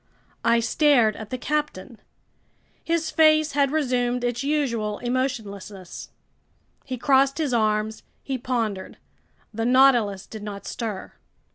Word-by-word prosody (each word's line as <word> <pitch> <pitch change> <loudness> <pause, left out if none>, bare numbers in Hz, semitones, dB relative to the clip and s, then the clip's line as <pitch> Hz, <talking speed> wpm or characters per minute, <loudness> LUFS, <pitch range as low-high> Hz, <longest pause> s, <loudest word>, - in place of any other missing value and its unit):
I 235 0 +3
stared 240 -4 +3
at 220 -1 -8
the 255 - -3
captain. 270 -6 -3 0.8
His 330 -1 -1
face 310 -1 +4
had 280 -1 +2
resumed 250 -4 0
its 245 0 -1
usual 235 -8 -1
emotionlessness. 215 -7 -4 0.7
He 255 -2 -5
crossed 270 +2 +3
his 300 -6 -1
arms. 215 -1 0 0.2
He 265 -2 -3
pondered. 225 -6 -3 0.6
The 225 +1 -2
Nautilus 240 -6 +4
did 220 - -9
not 205 -1 -7
stir. 215 -5 -5
245 Hz, 120 wpm, -24 LUFS, 215-275 Hz, 0.8 s, face